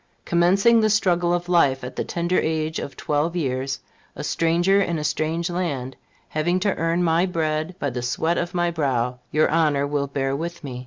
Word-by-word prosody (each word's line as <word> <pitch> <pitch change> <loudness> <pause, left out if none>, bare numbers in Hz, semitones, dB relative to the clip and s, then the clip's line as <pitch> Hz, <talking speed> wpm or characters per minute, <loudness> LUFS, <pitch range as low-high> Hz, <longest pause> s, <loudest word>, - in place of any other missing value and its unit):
Commencing 195 +7 +4
the 215 -1 +3
struggle 180 -4 +2
of 175 0 -1
life 140 -7 +3
at 125 - -7
the - - -1
tender 175 +1 0
age 160 0 -1
of 140 - -7
twelve 150 +3 -1
years, 135 -4 -2 0.3
a - - -6
stranger 175 +4 +2
in 170 -3 -1
a 150 - -3
strange 160 +3 -1
land, 145 -8 -3 0.3
having 175 +4 0
to 200 0 +1
earn 165 +2 0
my 165 0 +3
bread 160 0 -2
by 145 -6 -2
the 125 0 -4
sweat 160 +7 0
of 175 +1 -4
my 175 -1 +1
brow, 125 -6 -1
your 155 +4 +3
Honor 150 -3 +2
will 145 -1 -1
bear 135 -1 -1
with 170 +3 -5
me. 130 -3 -6
165 Hz, 195 wpm, -23 LUFS, 140-175 Hz, 0.3 s, Commencing